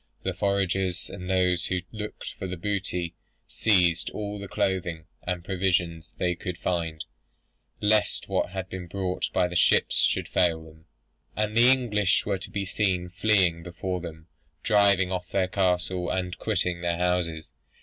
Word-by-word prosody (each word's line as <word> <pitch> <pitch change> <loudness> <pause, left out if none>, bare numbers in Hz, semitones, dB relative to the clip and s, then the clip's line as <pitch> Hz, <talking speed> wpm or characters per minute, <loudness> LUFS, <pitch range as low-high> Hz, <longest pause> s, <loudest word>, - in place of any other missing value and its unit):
The 95 - -1
foragers, 95 -1 0
and 90 0 -7
those 90 -1 +2
who 90 -1 -1
looked 105 -1 -6
out 95 - -3
for 90 - -4
booty, 90 -2 -2 0.3
seized 90 -6 +2
all 105 -1 -5
the 100 - -6
clothing 85 -5 -1 0.2
and 90 -1 -2
provisions 90 -4 0
they 90 -1 +1
could 90 0 -5
find, 85 -4 -2 0.8
lest 105 -1 +2
what - - 0
had 95 0 -5
been 95 -2 -7
brought 90 0 -2
by 90 - +2
the 90 - -7
ships 85 - +4
should - - +2
fail 80 -2 +1
them. 80 0 -16 0.5
And 105 0 -1
the 120 +2 +7
English 105 -7 +2
were 100 -2 -1
to - - -7
be 100 -1 -3
seen 95 -3 0
fleeing 95 -3 +2
before 90 +1 -4
them, 80 -2 -8 0.4
driving 100 -3 +4
off 90 -1 -3
their 95 -2 +1
cattle, 90 -1 0
and 90 -1 -2
quitting 90 -5 0
their 85 -1 0
houses. 85 -5 -1
90 Hz, 160 wpm, -27 LUFS, 90-100 Hz, 0.8 s, the